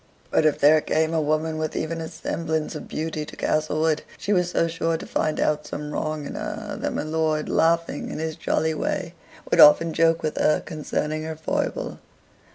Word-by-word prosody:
But 155 - +4
if 150 - +1
there 155 +2 +6
came 160 +1 0
a 160 - +2
woman 155 +1 0
with 155 0 -3
even 165 +1 -2
a 160 - -4
semblance 160 -1 -3
of - - -7
beauty 155 0 -3
to - - -10
Castlewood, 155 0 +1 0.2
she 205 - -1
was 180 -2 +2
so 165 - +1
sure 165 0 -1
to - - -8
find 155 - -1
out 150 0 0
some 150 0 -5
wrong 155 0 -3
in - - -6
her, - - -5
that - - -1
my - - -1
lord, 155 -1 0
laughing 165 +1 +1
in - - -5
his 160 0 -3
jolly 160 +1 0
way, 165 +2 -2 0.4
would - - +3
often 160 +2 +8
joke 165 +1 +3
with 155 - -2
her 150 - +3
concerning 155 0 -3
her 160 0 -4
foible. 160 - -2
155 Hz, 195 wpm, -24 LUFS, 155-160 Hz, 0.4 s, often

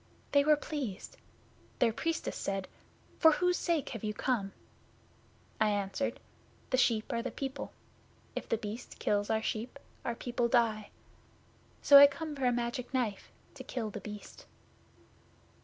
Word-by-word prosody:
They 285 0 +5
were 305 +1 +5
pleased. 285 -9 -5 0.6
Their 230 -3 +3
Priestess 330 +7 -2
said, 195 -1 -3 0.5
"For 320 -1 +7
whose 360 +2 +2
sake 335 -5 0
have 225 -3 -6
you 210 0 -2
come?" 215 -7 -1 1.1
I 215 -1 +4
answered, 205 +5 -1 0.5
"The 255 - +3
sheep 230 -4 +2
are 235 - 0
the 255 - -3
people. 270 +2 -5 0.6
If - - -5
The 230 - +2
Beast 220 +2 -7
kills 205 0 0
our 220 0 +1
sheep, 230 +6 -3 0.3
our 235 - -2
people 240 0 -1
die. 230 -3 +2 0.9
So 280 -1 +10
I 285 - +11
come 295 +2 -6
for 270 -2 -2
a - - +4
Magic 240 +1 -2
Knife 220 -6 -1 0.2
to - - -9
kill 225 -4 -4
The 210 - -6
Beast." 210 0 -10
235 Hz, 150 wpm, -32 LUFS, 215-280 Hz, 1.1 s, I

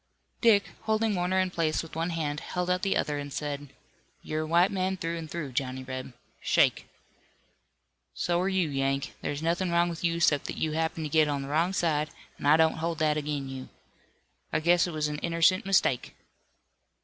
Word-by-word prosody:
Dick, 215 -4 +4
holding 220 0 +1
Warner 185 0 +1
in 185 -1 +1
place 160 -3 0
with 165 - -11
one 165 +2 -1
hand, 150 -3 -2
held 180 +2 -2
out 180 0 +1
the 195 0 +1
other, 145 -1 -1
and 145 0 -6
said: 145 0 -4 0.6
"You're 155 0 -2
a 155 - -3
white 170 +4 +4
man, 190 0 -1
through 165 -1 -3
and 165 -2 -6
through, 155 -5 -5
Johnny 130 0 -2
Reb. 130 0 -6 0.3
Shake!" - - +2 1.3
"So 175 0 0
are 190 - +1
you, 190 -3 +1
Yank. 135 -1 -1
There's 145 +2 -3
nothin' 175 +3 0
wrong 170 0 +3
with 170 0 -6
you 170 0 +1
'cept 145 -4 +3
that - - -5
you 155 - 0
happened 160 0 -1
to - - -3
get 155 0 +4
on 140 -1 -1
the 135 - -7
wrong 165 +5 +2
side, 155 -5 0 0.3
an' - - -2
I 150 +2 +7
don't 160 0 +3
hold 165 0 -2
that 155 -1 +2
ag'in 145 -2 -2
you. 130 -1 -7 0.8
I 155 - +1
guess 175 +2 +3
it - - -4
was 155 -1 -1
an 150 0 -4
innercent 170 +3 +2
mistake." 175 -10 +2
160 Hz, 200 wpm, -28 LUFS, 145-175 Hz, 1.3 s, I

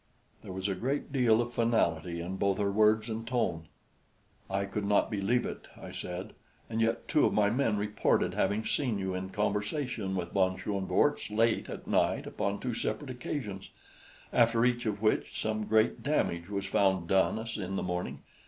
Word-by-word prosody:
There - - -8
was 95 +1 -3
a 100 - 0
great 135 +8 -2
deal 120 -4 +4
of 120 0 -8
finality 85 -8 +1
in 90 +3 -4
both 100 0 +1
her 100 -1 +1
words 110 +1 +4
and 115 0 -4
tone. 90 -10 -1 0.8
"I 100 +1 0
could 100 +1 -3
not 100 +2 +2
believe 105 +4 +1
it," - - -6
I - - -8
said; 90 +4 -5 0.4
"and 115 0 0
yet 115 +1 0
two 150 - +3
of - - -1
my 105 -1 +4
men 115 -4 +1
reported 105 +1 +1
having 110 +2 0
seen 125 -7 0
you 95 -1 -2
in 95 +1 -4
conversation 105 +1 -1
with 85 -2 -3
von 95 -1 +2
Schoenvorts 100 -2 0
late 115 +2 +1
at - - -7
night - - +1
upon 100 0 -2
two 125 -2 -3
separate 115 +5 -3
occasions 120 -6 -5 0.6
after 115 0 +4
each 120 -1 +1
of 105 0 -2
which 110 - +1
some 110 -1 -1
great 110 +1 +2
damage 90 - 0
was 100 -1 -2
found 95 -3 +2
done 95 +3 +3
us 115 +1 -5
in 95 -2 -3
the - - -1
morning. 90 0 -3
105 Hz, 180 wpm, -30 LUFS, 95-115 Hz, 0.8 s, deal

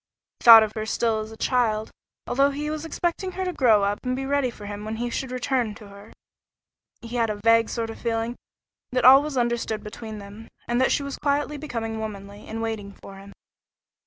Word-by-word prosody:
He - - -14
thought 225 -2 +11
of 215 - -3
her 215 - -4
as 220 - -4
still 225 -2 0
a 220 - -11
child, 220 -4 0 0.3
although 275 +2 +2
he 295 +2 -4
was 310 +1 -4
expecting 350 +3 -2
her 375 +1 -3
to 360 - -2
grow 225 -9 +4
up 205 +1 0
and 255 0 -1
be 270 +1 -4
ready 280 -2 +1
for 210 -3 -11
him 205 0 -6
when 215 +1 -4
he 240 +1 -3
should 265 +2 -3
return 250 -3 -1
to 210 -2 -13
her. 200 +2 -14 0.9
He 235 +1 -5
had 230 -1 +1
a 210 - -2
vague 230 +2 +3
sort 225 -1 -3
of - - -11
feeling 230 0 -2 0.6
that 255 -1 +1
all 265 +2 +9
was 295 -2 -4
understood 235 -2 -1
between 215 +1 -8
them, 205 +2 -11 0.2
and 240 +1 +1
that 260 - +3
she 285 - +1
was 280 0 -5
quietly 290 +1 0
becoming 230 -7 -4
womanly, 205 -1 -8
and 225 +1 -4
waiting 210 -3 -4
for 195 - -10
him. 200 +1 -12
230 Hz, 220 wpm, -24 LUFS, 215-265 Hz, 0.9 s, thought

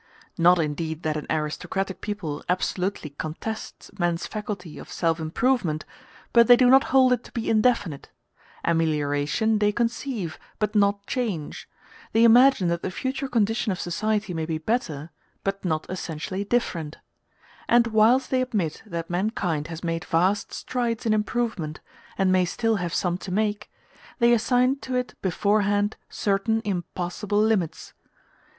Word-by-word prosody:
Not 175 +2 +5
indeed 160 +1 -2
that 155 -2 0
an 150 - -4
aristocratic 175 +5 -2
people 185 -9 -4
absolutely 180 -3 -1
contests 160 +9 -6
man's 175 -1 0
faculty 205 -6 -6
of - - -11
self 165 -1 0
improvement, 160 -1 0 0.5
but 235 -1 +6
they 245 - +9
do 250 0 +5
not 270 +1 +6
hold 260 -1 +5
it 245 0 -2
to - - -13
be 230 - -3
indefinite; 215 - +1 0.6
amelioration 160 +6 +1
they 210 0 +3
conceive, 230 - -2 0.2
but 210 -1 -1
not 200 -1 +2
change: 205 - -3 0.4
they 225 - +5
imagine 240 -3 +6
that 170 0 -1
the - - -2
future 260 +8 -3
condition 225 -3 +1
of 185 - -3
society 210 +3 -1
may 160 -1 -3
be 160 -1 -1
better, 160 - -2 0.3
but 195 0 -2
not 155 -4 -1
essentially 185 +1 -4
different; 175 -9 -1 0.7
and 240 0 +5
whilst 230 +4 +3
they 260 -1 +2
admit 205 -11 -2
that 170 -4 -4
mankind 175 -5 -1
has 165 0 -7
made 165 -1 -2
vast 185 +5 +1
strides 240 -3 -2
in 220 - +3
improvement, 210 -7 -1 0.4
and 190 -1 +3
may 185 0 +4
still 225 +5 0
have 175 -2 -3
some 180 0 0
to 190 - -7
make, 210 +1 -1 0.5
they 235 -1 +5
assign 250 +3 +3
to 260 -2 -5
it 250 0 -1
beforehand 205 +2 +1
certain 205 +2 0
impassable 190 +2 -2
limits. 210 -7 0
200 Hz, 145 wpm, -25 LUFS, 165-225 Hz, 0.7 s, they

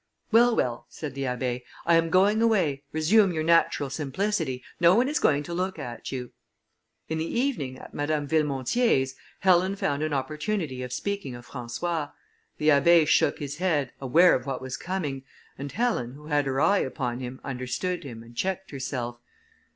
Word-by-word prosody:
"Well! 235 +1 +5
well!" 120 -1 -1
said 150 -4 -6
the 135 0 -3
Abbé, 125 -1 -2 0.2
"I 170 - +4
am 165 0 +4
going 200 +5 +4
away, 185 -12 +2
resume 185 +6 +4
your 160 -2 -1
natural 160 -4 +3
simplicity, 150 -1 -2 0.2
no 175 +1 +6
one 245 +3 +3
is 300 +2 0
going 145 -1 +3
to 170 - -6
look 185 +1 -2
at 120 -6 -6
you." 125 -2 -5 0.8
In 160 0 -2
the 165 +8 -1
evening, 150 - -1
at - - -12
Madame 145 0 -1
Villemontier's, 140 - +1 0.3
Helen 185 0 +4
found 145 -7 -1
an 155 0 -1
opportunity 150 +1 -2
of 125 -1 -5
speaking 200 -2 -3
of 120 0 -11
François. 145 +5 -3 0.4
The 150 - +2
Abbé 155 +2 +5
shook 160 -2 +3
his 145 0 -5
head, 160 -8 0
aware 165 +7 +5
of 125 +2 -1
what 135 -2 -2
was 130 0 -5
coming; 160 -8 -3 0.3
and 140 +1 -6
Helen, 210 - -1
who 150 +2 -13
had 145 -2 +1
her 135 0 0
eye 200 +6 +4
upon 125 -2 -2
him, 130 0 -6
understood 140 +8 -3
him, 115 -5 -8
and 120 +1 -15
checked 190 +5 -2
herself. 125 -3 -4
150 Hz, 175 wpm, -26 LUFS, 130-180 Hz, 0.8 s, no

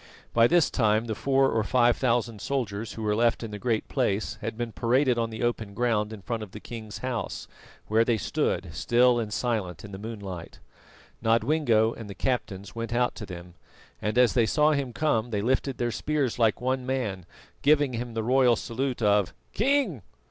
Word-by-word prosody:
By 115 0 +6
this 175 +1 +3
time 110 -2 +2
the 110 - -2
four 135 +3 +2
or 110 - +1
five 120 +2 +3
thousand 115 -4 0
soldiers 115 -6 -3
who 110 - -6
were 105 -1 +1
left 115 +1 +2
in 115 - -5
the 105 - -6
Great 115 0 -1
Place 110 -6 -1
had - - -4
been 120 -1 -3
paraded 125 +2 +2
on 115 -1 0
the 110 +1 -5
open 110 -4 -2
ground 110 -3 +1
in 105 -3 -9
front 115 +4 -3
of 105 -4 -8
the - - -7
king's 110 -3 -8
house, 120 -6 -3 0.4
where 110 +2 +3
they 115 -1 +1
stood, 100 - -1
still 120 +9 +3
and 110 -2 -3
silent, 105 -6 -2
in 100 - -10
the 95 - -7
moonlight. 100 -6 -7 0.6
Nodwengo 115 0 +2
and 110 -3 -9
the 100 - -7
captains 100 -5 -2
went 115 0 -4
out 125 0 +2
to 105 - -8
them, 90 -1 -9 0.5
and 105 +3 -1
as 125 -1 +5
they 120 -3 +3
saw 150 +4 +3
him 140 -4 -1
come 120 -3 0
they 105 -3 -1
lifted 130 +2 0
their 120 -1 -1
spears 140 -1 -1
like 110 -2 +3
one 130 +1 -1
man, 115 -9 -3 0.3
giving 145 -2 +3
him 120 0 -4
the 110 - -1
royal 125 0 +4
salute 125 +2 -3
of 105 -3 +2 0.2
"King!" 240 - +1
115 Hz, 195 wpm, -27 LUFS, 105-125 Hz, 0.6 s, By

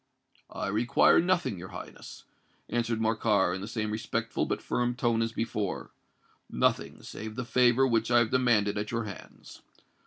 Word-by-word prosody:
"I - - -5
require 110 +10 +4
nothing, 175 - 0
your 90 - -8
Highness," - - -10 0.4
answered 115 -1 -1
Morcar, 110 -4 +2
in 95 - -4
the 100 - -5
same 110 -1 -3
respectful 115 +1 -2
but - - -1
firm 120 0 -1
tone 120 -3 +1
as 115 0 0
before,—"nothing 110 -4 -3
save 110 0 -7
the 125 0 -4
favour 125 +1 +4
which 115 -3 +1
I 120 - +5
have 120 -2 +3
demanded 110 -5 +2
at 105 - -4
your 115 0 -1
hands. 100 -3 -11
115 Hz, 155 wpm, -29 LUFS, 105-120 Hz, 0.4 s, I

